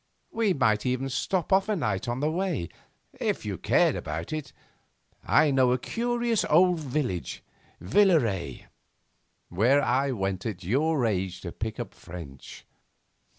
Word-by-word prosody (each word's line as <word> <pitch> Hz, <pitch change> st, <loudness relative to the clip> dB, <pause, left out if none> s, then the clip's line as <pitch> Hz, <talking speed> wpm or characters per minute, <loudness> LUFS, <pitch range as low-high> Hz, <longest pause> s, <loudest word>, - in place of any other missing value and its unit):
We 225 Hz, -3 st, +1 dB
might 110 Hz, -7 st, +2 dB
even 130 Hz, +1 st, -1 dB
stop 175 Hz, +8 st, -1 dB
off 195 Hz, +2 st, +3 dB
a 215 Hz, -, +2 dB
night 155 Hz, -6 st, -2 dB
on 120 Hz, +2 st, -2 dB
the 150 Hz, +1 st, +1 dB
way 170 Hz, -, -2 dB, 0.5 s
if -, -, -1 dB
you -, -, -4 dB
cared -, -, +3 dB
about 80 Hz, -, -5 dB
it. 155 Hz, -4 st, -5 dB, 0.7 s
I 150 Hz, -, +4 dB
know 130 Hz, -2 st, +3 dB
a -, -, +1 dB
curious 235 Hz, -, -1 dB
old 175 Hz, +2 st, +4 dB
village 130 Hz, -, -3 dB, 0.4 s
Villaret 105 Hz, -, +2 dB, 0.8 s
where 125 Hz, +11 st, +3 dB
I 135 Hz, +3 st, +1 dB
went 95 Hz, -6 st, -2 dB
at 95 Hz, -4 st, -5 dB
your 140 Hz, -, +1 dB
age 95 Hz, -4 st, -2 dB
to 85 Hz, -, -6 dB
pick 110 Hz, +5 st, -5 dB
up 115 Hz, -5 st, -5 dB
French. 80 Hz, -6 st, -11 dB
130 Hz, 145 wpm, -27 LUFS, 95-160 Hz, 0.8 s, I